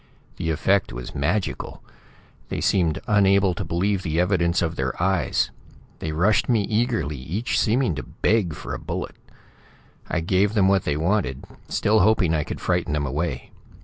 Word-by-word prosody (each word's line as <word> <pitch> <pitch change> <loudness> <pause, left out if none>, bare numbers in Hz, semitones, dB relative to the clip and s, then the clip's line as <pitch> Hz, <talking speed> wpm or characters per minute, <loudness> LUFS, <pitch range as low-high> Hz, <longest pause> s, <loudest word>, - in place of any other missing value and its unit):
"The 85 -2 -2
effect 95 +5 +1
was - - -7
magical. 85 +8 -2 0.7
They - - -3
seemed 85 -5 +1
unable 100 -2 +4
to - - -4
believe 95 +3 0
the 80 -2 -1
evidence 90 -2 +2
of 85 0 -2
their 65 -3 -3
eyes. 95 +1 +1 0.5
They 80 - -3
rushed 90 +11 +2
me 115 -4 +3
eagerly, 110 - 0
each 85 - -2
seeming 120 -2 +2
to 75 - -4
beg 100 -8 0
for - - -6
a - - -4
bullet. - - -5 0.9
"I - - 0
gave 95 +5 +1
them 100 -3 +4
what 95 -1 +2
they 75 - 0
wanted, 85 -5 0 0.2
still 110 +1 +2
hoping 95 -5 +3
I 75 -2 +1
could - - -6
frighten - - 0
them 75 -1 0
away. 70 -2 -3
90 Hz, 165 wpm, -23 LUFS, 80-105 Hz, 0.9 s, unable